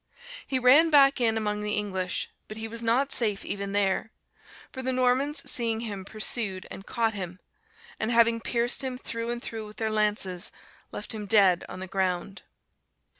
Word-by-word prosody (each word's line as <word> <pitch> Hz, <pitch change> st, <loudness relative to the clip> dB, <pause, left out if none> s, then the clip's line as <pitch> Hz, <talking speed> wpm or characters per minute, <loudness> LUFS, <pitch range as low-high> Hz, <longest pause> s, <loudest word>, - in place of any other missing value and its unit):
He 265 Hz, -, 0 dB
ran 265 Hz, +6 st, +6 dB
back 275 Hz, -3 st, +5 dB
in 225 Hz, -2 st, +3 dB
among 210 Hz, -1 st, -1 dB
the 210 Hz, 0 st, -1 dB
English, 190 Hz, -3 st, -2 dB, 0.2 s
but 215 Hz, -, -8 dB
he 220 Hz, 0 st, -4 dB
was 230 Hz, +1 st, -7 dB
not 245 Hz, +5 st, +1 dB
safe 210 Hz, -4 st, 0 dB
even 200 Hz, 0 st, -3 dB
there; 200 Hz, +2 st, +1 dB, 0.6 s
for 260 Hz, -, -6 dB
the 260 Hz, 0 st, -1 dB
Normans 255 Hz, +4 st, +1 dB
seeing 230 Hz, -2 st, +2 dB
him, 200 Hz, -5 st, -5 dB
pursued 210 Hz, -2 st, -1 dB
and 195 Hz, -, -9 dB
caught 225 Hz, -1 st, 0 dB
him; 185 Hz, -2 st, -6 dB, 0.6 s
and 220 Hz, -, -1 dB
having 230 Hz, -1 st, +4 dB
pierced 240 Hz, +3 st, 0 dB
him 260 Hz, -1 st, -3 dB
through 230 Hz, -2 st, -4 dB
and 240 Hz, 0 st, -2 dB
through 220 Hz, -1 st, -6 dB
with 210 Hz, -, -13 dB
their 220 Hz, -1 st, -1 dB
lances, 210 Hz, -4 st, -1 dB, 0.4 s
left -, -, -6 dB
him 210 Hz, -2 st, -6 dB
dead 195 Hz, -4 st, +4 dB
on 185 Hz, -, -7 dB
the -, -, -4 dB
ground. 190 Hz, +1 st, -2 dB
220 Hz, 175 wpm, -27 LUFS, 200-240 Hz, 0.6 s, ran